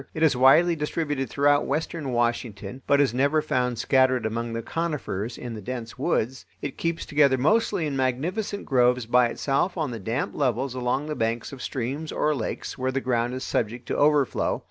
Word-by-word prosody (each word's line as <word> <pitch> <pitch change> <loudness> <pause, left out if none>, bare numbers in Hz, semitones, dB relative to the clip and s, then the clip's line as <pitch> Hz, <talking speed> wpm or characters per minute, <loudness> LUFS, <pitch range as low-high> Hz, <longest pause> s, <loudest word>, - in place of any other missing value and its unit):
It 160 - 0
is 155 -4 +4
widely 155 +7 +5
distributed 150 -3 -2
throughout 145 0 +2
western 150 -1 -2
Washington, 120 -1 -2
but 140 - +4
is 140 -5 +3
never 140 +5 +2
found 125 -5 0
scattered 130 0 +2
among 115 +1 -2
the 115 0 -3
conifers 140 - -3
in 120 -2 -6
the 110 - -7
dense 115 +1 -6
woods. 130 +4 -1
It 140 - -5
keeps 165 0 -2
together 145 -3 +3
mostly 180 - +2
in 145 -2 -2
magnificent 165 - -2
groves 125 -2 +3
by 120 +1 +4
itself 140 +9 -1
on 155 -5 -1
the 115 - -5
damp 115 +7 -2
levels 130 -1 0
along 130 +3 -1
the 155 - -3
banks 115 -1 -2
of 130 - -9
streams 135 +5 -3
or 150 - +1
lakes 120 -2 -4
where 130 0 0
the 135 - 0
ground 125 -1 -1
is 130 - -5
subject 120 +1 -2
to - - 0
overflow. 145 -2 +2
130 Hz, 190 wpm, -25 LUFS, 120-150 Hz, -, widely